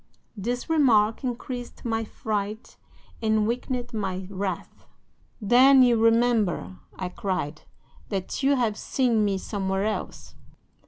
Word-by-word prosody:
"'This 240 Hz, +4 st, -3 dB
remark 240 Hz, -9 st, +3 dB
increased 245 Hz, 0 st, -5 dB
my 225 Hz, -1 st, 0 dB
fright 215 Hz, 0 st, -4 dB, 0.5 s
and 220 Hz, -1 st, +2 dB
weakened 245 Hz, +1 st, -3 dB
my 190 Hz, -3 st, -3 dB
wrath. 190 Hz, -2 st, -5 dB, 0.6 s
"'"Then 255 Hz, +5 st, +6 dB
you 245 Hz, -1 st, +4 dB
remember," 225 Hz, -, +2 dB, 0.2 s
I 185 Hz, -, -4 dB
cried, 180 Hz, -5 st, -3 dB, 0.5 s
"that 195 Hz, +3 st, -3 dB
you 280 Hz, +1 st, +3 dB
have 230 Hz, -5 st, 0 dB
seen 240 Hz, -5 st, +1 dB
me 200 Hz, -2 st, +1 dB
somewhere 190 Hz, 0 st, -2 dB
else." 215 Hz, -, -4 dB
220 Hz, 115 wpm, -25 LUFS, 195-245 Hz, 0.6 s, Then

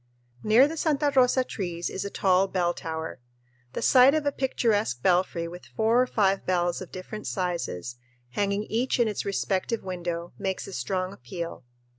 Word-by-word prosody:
Near 230 Hz, -, +6 dB
the 325 Hz, +2 st, -6 dB
Santa 295 Hz, -2 st, +1 dB
Rosa 255 Hz, 0 st, +4 dB
trees 175 Hz, -7 st, -4 dB
is 190 Hz, -, -4 dB
a 200 Hz, -, -4 dB
tall 190 Hz, -1 st, +3 dB
bell 175 Hz, -2 st, 0 dB
tower. 160 Hz, -4 st, -5 dB, 0.5 s
The -, -, -3 dB
sight 260 Hz, +2 st, +7 dB
of 310 Hz, -1 st, 0 dB
a 285 Hz, -, +2 dB
picturesque 215 Hz, -, 0 dB
belfry 175 Hz, -2 st, +2 dB
with 175 Hz, +1 st, -10 dB
four 225 Hz, +3 st, +2 dB
or 255 Hz, -, +1 dB
five 195 Hz, -4 st, +2 dB
bells 175 Hz, -1 st, 0 dB
of 185 Hz, -, -8 dB
different 200 Hz, +3 st, -7 dB
sizes 170 Hz, -, -3 dB, 0.3 s
hanging 200 Hz, +6 st, 0 dB
each 235 Hz, +5 st, -1 dB
in 235 Hz, -, +4 dB
its 210 Hz, -, -3 dB
respective 200 Hz, +2 st, -1 dB
window 175 Hz, -2 st, -4 dB
makes 190 Hz, -1 st, -2 dB
a 195 Hz, -, -9 dB
strong 185 Hz, 0 st, -2 dB
appeal. 165 Hz, 0 st, -7 dB
190 Hz, 170 wpm, -27 LUFS, 175-225 Hz, 0.5 s, sight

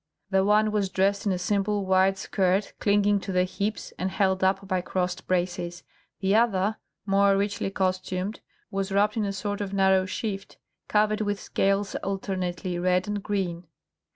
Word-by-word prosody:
The 190 Hz, 0 st, +4 dB
one 210 Hz, +2 st, +3 dB
was 205 Hz, -2 st, 0 dB
dressed 200 Hz, +2 st, +1 dB
in -, -, +3 dB
a 185 Hz, -, 0 dB
simple 200 Hz, +2 st, 0 dB
white 190 Hz, +1 st, +3 dB
skirt 190 Hz, +1 st, 0 dB
clinging 205 Hz, 0 st, +3 dB
to 195 Hz, -, -5 dB
the 180 Hz, 0 st, +3 dB
hips 200 Hz, +3 st, -3 dB
and 185 Hz, -, 0 dB
held 190 Hz, -1 st, +1 dB
up 190 Hz, +1 st, +1 dB
by 185 Hz, -2 st, 0 dB
crossed 180 Hz, 0 st, -2 dB
braces; 175 Hz, -1 st, -1 dB, 0.4 s
the 195 Hz, 0 st, +2 dB
other, 215 Hz, -2 st, +2 dB, 0.3 s
more 200 Hz, 0 st, +4 dB
richly 200 Hz, 0 st, -1 dB
costumed, 185 Hz, +1 st, -2 dB, 0.3 s
was 195 Hz, 0 st, -2 dB
wrapped 205 Hz, +2 st, +2 dB
in 220 Hz, -2 st, 0 dB
a 200 Hz, -, -1 dB
sort 205 Hz, +1 st, -3 dB
of 200 Hz, -1 st, -3 dB
narrow 190 Hz, -1 st, +3 dB
shift, 195 Hz, 0 st, -4 dB, 0.3 s
covered 215 Hz, +1 st, +2 dB
with 205 Hz, -1 st, -1 dB
scales 195 Hz, +1 st, 0 dB
alternately 185 Hz, -2 st, -3 dB
red 180 Hz, +1 st, +1 dB
and 205 Hz, -1 st, -2 dB
green. 185 Hz, -4 st, -2 dB
195 Hz, 165 wpm, -26 LUFS, 185-205 Hz, 0.4 s, The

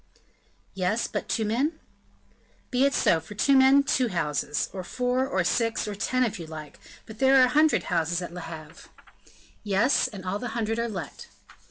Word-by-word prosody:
"Yes, 195 Hz, +5 st, 0 dB
but -, -, -5 dB
two 220 Hz, -, 0 dB
men?" 255 Hz, +9 st, 0 dB, 1.0 s
"Be 255 Hz, +1 st, +3 dB
it 280 Hz, -, +1 dB
so; 165 Hz, -, +3 dB
for 165 Hz, +6 st, -11 dB
two 275 Hz, +6 st, +3 dB
men, 265 Hz, +1 st, +6 dB
two 260 Hz, -3 st, +1 dB
houses, 150 Hz, -6 st, -1 dB
or 190 Hz, -2 st, -5 dB
four 250 Hz, +5 st, -1 dB
or 190 Hz, -6 st, 0 dB
six, 230 Hz, +4 st, 0 dB
or 210 Hz, -, -3 dB
ten, 255 Hz, +5 st, 0 dB
if 225 Hz, -4 st, -2 dB
you 165 Hz, -, -7 dB
like; 155 Hz, -2 st, -9 dB, 0.3 s
but 220 Hz, 0 st, -12 dB
there 270 Hz, 0 st, +5 dB
are -, -, +7 dB
a -, -, -1 dB
hundred 305 Hz, +4 st, +3 dB
houses 165 Hz, +1 st, 0 dB
at 175 Hz, -1 st, -7 dB
Le 180 Hz, -, -7 dB
Havre." 155 Hz, -2 st, -10 dB, 0.7 s
"Yes, 210 Hz, +6 st, +2 dB
and 195 Hz, -3 st, -9 dB
all 190 Hz, +3 st, -2 dB
the 240 Hz, -1 st, -5 dB
hundred 225 Hz, 0 st, -1 dB
are 235 Hz, 0 st, -1 dB
let." 180 Hz, -9 st, -7 dB
215 Hz, 190 wpm, -26 LUFS, 180-255 Hz, 1.0 s, are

